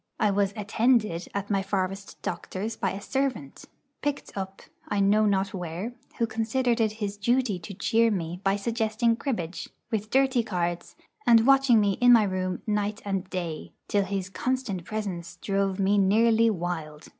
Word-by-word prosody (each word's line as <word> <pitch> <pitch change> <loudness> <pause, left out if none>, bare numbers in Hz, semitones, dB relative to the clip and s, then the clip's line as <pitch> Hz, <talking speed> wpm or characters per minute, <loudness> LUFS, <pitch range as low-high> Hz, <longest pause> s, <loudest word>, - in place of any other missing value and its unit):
I 210 - +3
was 200 0 +1
'attended' 215 -3 +1
at 200 +1 -3
my 195 -1 +2
forest 195 0 -3
doctor's 215 +4 -4
by 195 - -1
a 195 - -5
servant, 255 - -3 0.4
picked 290 -1 -3
up 190 -1 -6 0.2
I 205 - -1
know 210 +2 +4
not 195 -1 +1
where, 180 +5 -4 0.2
who 235 - +2
considered 230 +2 0
it 215 -1 +1
his 205 -2 -4
duty 235 -2 +1
to 180 +3 -9
cheer 230 +4 +3
me 175 -3 -3
by 195 0 +2
suggesting 225 +2 0
cribbage, 180 - -4 0.2
with 215 -1 -2
dirty 265 -1 +3
cards, 175 -5 -3 0.3
and 230 -1 +6
watching 270 -3 +6
me, 200 -2 +1
in 245 0 +7
my 225 -2 +7
room, 185 -2 -2
night 210 0 -1
and 195 -2 -2
day, 170 -5 -5
till 200 -1 +1
his 195 -1 -3
constant 235 -6 -2
presence 180 -6 -4
drove 195 0 -1
me 200 +1 +3
nearly 225 +3 +4
wild. 165 -5 -4
205 Hz, 165 wpm, -27 LUFS, 190-225 Hz, 0.4 s, in